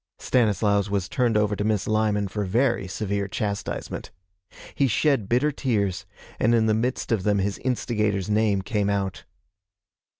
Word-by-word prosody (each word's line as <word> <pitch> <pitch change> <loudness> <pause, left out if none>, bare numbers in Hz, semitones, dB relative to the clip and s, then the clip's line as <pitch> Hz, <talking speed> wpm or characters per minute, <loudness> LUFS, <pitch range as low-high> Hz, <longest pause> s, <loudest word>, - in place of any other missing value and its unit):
Stanislaus 105 -4 +1
was 100 -2 -1
turned 120 -3 +1
over 105 -1 +1
to 105 - -2
Miss 105 -2 0
Lyman 105 -2 +1
for 105 +2 -3
very 115 +1 +1
severe 100 +1 -2
chastisement. 100 +1 -4 0.6
He 140 - +2
shed 130 -3 +1
bitter 130 +6 +2
tears, 100 -8 -1 0.3
and 115 +2 +3
in 110 -1 +3
the 110 - +3
midst 120 +4 -1
of 110 -4 +2
them 105 +1 +1
his 100 +1 -1
instigator's 105 -6 -1
name 105 -2 +1
came 105 -1 0
out. 100 -3 -2
105 Hz, 155 wpm, -25 LUFS, 100-115 Hz, 0.6 s, and